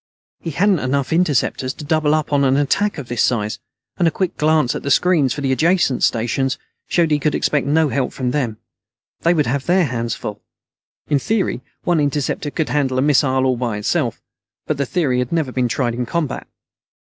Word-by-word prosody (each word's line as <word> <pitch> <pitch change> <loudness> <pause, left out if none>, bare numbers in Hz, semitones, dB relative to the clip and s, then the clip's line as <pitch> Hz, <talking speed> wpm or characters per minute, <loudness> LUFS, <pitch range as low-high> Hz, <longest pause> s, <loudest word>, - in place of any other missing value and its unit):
He 165 - -5
hadn't 185 +4 +2
enough 135 +2 -1
interceptors 145 -5 +1
to - - -9
double 155 0 +2
up 155 -1 -2
on 140 -1 +3
an 135 0 +3
attack 185 +9 +1
of 140 -4 -6
this 120 -2 -1
size, 105 -3 0 0.4
and 175 - +3
a - - +5
quick 185 +2 -2
glance 155 -4 +2
at - - -4
the 140 - -4
screens 155 -3 +3
for 145 - -3
the 135 -1 0
adjacent 160 -1 +2
stations 125 +4 +1 0.3
showed 170 -3 +2
he 150 - +3
could 150 +1 0
expect 145 -2 0
no 155 +1 +3
help 135 -1 -1
from 125 -2 -2
them. 125 -6 -1 0.6
They 170 +1 +2
would 150 -3 +2
have 130 +3 -2
their 180 0 +4
hands 115 -4 -2
full. 105 -1 -6 0.7
In 145 -2 +2
theory, 215 +4 -1 0.2
one 175 -2 +2
interceptor 145 0 -1
could 155 +1 -2
handle 135 -3 0
a - - +2
missile 130 -2 +3
all 130 -1 +1
by 115 -4 -2
itself. 105 - -1 0.5
But 155 - -1
the 140 -1 -1
theory 140 -8 0
had 125 -1 -2
never 160 -6 0
been 125 -1 0
tried 120 0 -1
in 120 0 -3
combat. 170 -2 -2
140 Hz, 205 wpm, -19 LUFS, 130-160 Hz, 0.7 s, a